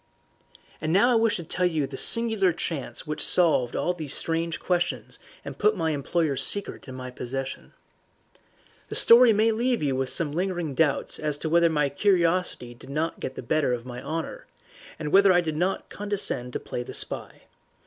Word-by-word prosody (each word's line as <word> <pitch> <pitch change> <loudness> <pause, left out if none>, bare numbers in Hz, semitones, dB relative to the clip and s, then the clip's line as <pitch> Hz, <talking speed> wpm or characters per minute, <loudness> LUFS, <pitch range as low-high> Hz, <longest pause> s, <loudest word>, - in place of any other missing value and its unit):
And 155 0 -1
now 200 +8 +4
I - - +3
wish 225 -1 +2
to 175 - -5
tell 180 +3 0
you 155 -5 -1
the 135 - -8
singular 220 - +2
chance 160 -4 -4
which 150 0 -4
solved 155 -9 +3
all 180 - 0
these 155 -5 -2
strange 165 0 -2
questions 175 -1 -2 0.3
and - - -8
put 210 0 +2
my 160 -2 0
employer's 145 0 0
secret 200 -6 0
in 130 - -8
my 125 0 -7
possession. 130 +2 -6 1.2
The - - -5
story 235 0 +7
may 220 +2 +3
leave 240 -2 0
you 135 -2 0
with 130 0 -2
some 155 0 +1
lingering 175 -2 -2
doubts 145 0 0
as 150 -1 -1
to 160 - -3
whether 170 +1 +4
my 150 -2 +1
curiosity 170 -5 0
did 120 - -15
not 155 +4 -2
get 130 - -5
the - - -7
better 140 +1 +1
of 120 0 -4
my 125 -1 -7
honour, 160 +3 -5 0.5
and 150 -2 -5
whether 195 0 +6
I 175 - +5
did 160 -3 -2
not 180 +5 -2
condescend 195 -12 -3
to - - -2
play - - -5
the 125 - -7
spy. - - -5
165 Hz, 190 wpm, -25 LUFS, 140-185 Hz, 1.2 s, story